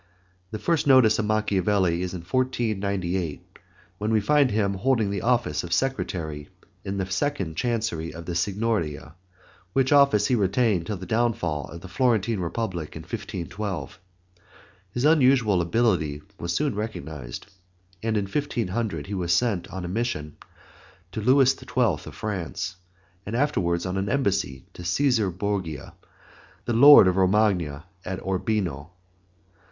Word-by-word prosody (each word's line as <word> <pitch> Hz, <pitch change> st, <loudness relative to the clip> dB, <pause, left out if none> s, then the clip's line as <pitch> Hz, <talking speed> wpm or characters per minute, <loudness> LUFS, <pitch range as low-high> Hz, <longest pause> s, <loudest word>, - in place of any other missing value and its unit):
[*] 90 Hz, -1 st, -39 dB
The 110 Hz, -, -5 dB
first 150 Hz, +8 st, 0 dB
notice 130 Hz, -6 st, +6 dB
of 110 Hz, -, 0 dB
Machiavelli 100 Hz, -4 st, +1 dB
is 90 Hz, 0 st, -3 dB
in 90 Hz, -, -6 dB
1498 95 Hz, -, -2 dB, 0.4 s
when 105 Hz, +1 st, -1 dB
we 110 Hz, -, +4 dB
find 140 Hz, +5 st, +3 dB
him 100 Hz, -2 st, +1 dB
holding 110 Hz, 0 st, +1 dB
the 100 Hz, -2 st, -2 dB
office 120 Hz, -10 st, +1 dB
of 85 Hz, -, -7 dB
Secretary 80 Hz, -, -2 dB, 0.3 s
in 100 Hz, 0 st, -4 dB
the 95 Hz, -, -1 dB
second 95 Hz, -, -2 dB
Chancery 110 Hz, -8 st, -2 dB
of 85 Hz, 0 st, -9 dB
the 85 Hz, -, -4 dB
Signoria, 90 Hz, -4 st, -1 dB, 0.6 s
which 130 Hz, -1 st, +2 dB
office 140 Hz, -8 st, +5 dB
he -, -, +1 dB
retained 100 Hz, -4 st, +1 dB
till 105 Hz, -, -3 dB
the 95 Hz, -, -8 dB
downfall 90 Hz, -, 0 dB
of 85 Hz, -, -9 dB
the 95 Hz, -, -9 dB
Florentine 115 Hz, +1 st, +1 dB
Republic 85 Hz, -2 st, -3 dB
in -, -, -7 dB
1512. 95 Hz, -3 st, -5 dB, 0.9 s
His 120 Hz, +8 st, -2 dB
unusual 130 Hz, -, +4 dB
ability 85 Hz, -7 st, 0 dB, 0.2 s
was 85 Hz, -, -3 dB
soon 145 Hz, +8 st, 0 dB
recognized, 80 Hz, -, -6 dB, 0.6 s
and 110 Hz, -1 st, 0 dB
in 100 Hz, -, 0 dB
1500 110 Hz, -, -2 dB
he 105 Hz, -, -6 dB
was 90 Hz, -3 st, -1 dB
sent 95 Hz, -1 st, +1 dB
on 95 Hz, -2 st, -6 dB
a -, -, -4 dB
mission 90 Hz, -7 st, -3 dB, 0.8 s
to 110 Hz, -, -4 dB
Louis 130 Hz, +3 st, +4 dB
XII. 130 Hz, -, -14 dB, 0.2 s
of 110 Hz, -6 st, -1 dB
France, 95 Hz, -, -4 dB, 0.5 s
and 105 Hz, +4 st, -5 dB
afterward 95 Hz, -12 st, 0 dB
on 90 Hz, +1 st, -2 dB
an 95 Hz, +1 st, -1 dB
embassy 100 Hz, -, -1 dB
to -, -, -10 dB
Cæsar 110 Hz, +4 st, +1 dB
Borgia, 95 Hz, -8 st, -3 dB, 0.7 s
the 120 Hz, -, -1 dB
lord 140 Hz, 0 st, +9 dB
of 90 Hz, 0 st, +1 dB
Romagna, 95 Hz, -6 st, +2 dB, 0.2 s
at 95 Hz, +1 st, -4 dB
Urbino. 95 Hz, -6 st, -1 dB
100 Hz, 145 wpm, -25 LUFS, 90-115 Hz, 0.9 s, lord